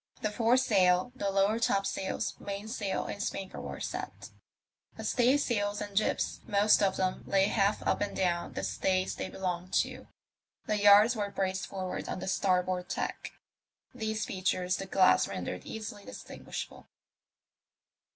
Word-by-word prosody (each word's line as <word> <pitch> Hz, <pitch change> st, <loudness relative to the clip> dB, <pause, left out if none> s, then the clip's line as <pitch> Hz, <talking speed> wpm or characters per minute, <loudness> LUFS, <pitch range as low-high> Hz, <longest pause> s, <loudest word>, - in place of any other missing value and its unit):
The 215 Hz, -, 0 dB
foresail, 220 Hz, -4 st, +3 dB
the 200 Hz, -6 st, -1 dB
lower 200 Hz, +3 st, +2 dB
top 200 Hz, -4 st, +2 dB
sails^ 195 Hz, -1 st, -2 dB
mainsail, 205 Hz, 0 st, -3 dB
and 200 Hz, -, -5 dB
spanker 195 Hz, -1 st, -4 dB
were -, -, -6 dB
set; -, -, -6 dB, 0.7 s
but -, -, -6 dB
staysails 240 Hz, -5 st, +2 dB
and 205 Hz, -1 st, -6 dB
jibs, 215 Hz, -, 0 dB
most 210 Hz, 0 st, +4 dB
of 195 Hz, -2 st, +2 dB
them, 185 Hz, -1 st, -1 dB
lay 195 Hz, 0 st, +3 dB
half 200 Hz, 0 st, +1 dB
up -, -, +1 dB
and 205 Hz, -, -2 dB
down 175 Hz, -2 st, 0 dB
the 95 Hz, -, -4 dB
stays 185 Hz, -, 0 dB
they -, -, -5 dB
belonged 185 Hz, -1 st, -4 dB
to; -, -, -10 dB, 0.6 s
the 210 Hz, -1 st, 0 dB
yards 205 Hz, +4 st, +7 dB
were 205 Hz, -2 st, -2 dB
braced 190 Hz, -1 st, -2 dB
forward 185 Hz, -1 st, -4 dB
on -, -, -3 dB
the -, -, -6 dB
star 185 Hz, -1 st, +2 dB
board 180 Hz, 0 st, -3 dB
tack. -, -, -4 dB, 0.6 s
These 220 Hz, 0 st, -2 dB
features 185 Hz, -1 st, -1 dB
the 195 Hz, -, -6 dB
glass 185 Hz, -1 st, +4 dB
rendered 90 Hz, 0 st, -5 dB
easily 215 Hz, -2 st, -6 dB
distinguishable. -, -, -8 dB
195 Hz, 150 wpm, -30 LUFS, 185-210 Hz, 0.7 s, yards